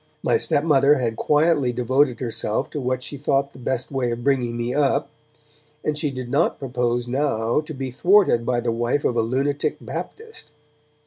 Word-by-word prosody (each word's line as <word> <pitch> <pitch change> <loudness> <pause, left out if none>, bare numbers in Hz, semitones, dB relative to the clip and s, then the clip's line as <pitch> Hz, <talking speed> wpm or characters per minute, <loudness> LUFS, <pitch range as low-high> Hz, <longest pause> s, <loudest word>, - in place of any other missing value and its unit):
My - - +2
stepmother 145 -1 +3
had 120 -5 -1
quietly 150 -3 +2
devoted 125 +2 +1
herself 115 -3 -2
to 145 - -4
what 130 0 -2
she 145 - -6
thought 140 0 0
the - - -13
best 130 +3 -2
way 130 -3 -1
of 120 0 -4
bringing 125 -4 +1
me 120 +1 -2
up, 140 0 +1 0.7
and 150 - -1
she 150 0 -1
did 130 -2 -6
not 140 +7 +1
propose 120 -2 -1
now 120 -1 0
to 155 0 -8
be 135 -1 -4
thwarted 180 - +4
by 120 0 0
the 120 -1 -1
wife 120 +5 -1
of 120 - +1
a 115 - +3
lunatic 135 +5 -1
Baptist. 450 0 -8
130 Hz, 180 wpm, -22 LUFS, 120-145 Hz, 0.7 s, thwarted